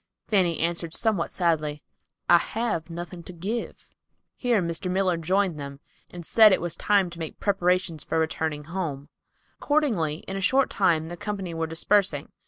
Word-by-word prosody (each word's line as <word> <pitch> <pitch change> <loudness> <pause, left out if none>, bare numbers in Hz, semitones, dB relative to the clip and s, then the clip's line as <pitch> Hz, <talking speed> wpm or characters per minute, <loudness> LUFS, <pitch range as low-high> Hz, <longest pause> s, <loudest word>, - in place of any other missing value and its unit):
Fanny 180 -6 +2
answered 170 0 -2
somewhat 215 -7 0
sadly, 155 -4 -1 0.4
"I've 175 0 +2
nothing 175 +1 -7
to 170 - -10
give." 200 +8 -5 0.5
Here 245 -4 +1
Mr. 170 +1 -2
Miller 185 -1 +2
joined 180 0 0
them, 140 -1 -7 0.3
and 175 -2 -9
said 220 +2 +7
it - - +3
was 175 -1 -3
time 195 -2 +2
to 170 - -10
make 160 -2 -6
preparations 180 -5 +1
for 165 - -2
returning' 160 -2 -1
home. 155 -4 -4 0.5
Accordingly 215 - +1
in 195 - -4
a 195 - -3
short 265 +8 +3
time 165 -5 +2
the 175 - -6
company 195 -3 -4
were 165 0 -2
dispersing. 165 -2 +1
175 Hz, 160 wpm, -26 LUFS, 160-195 Hz, 0.5 s, said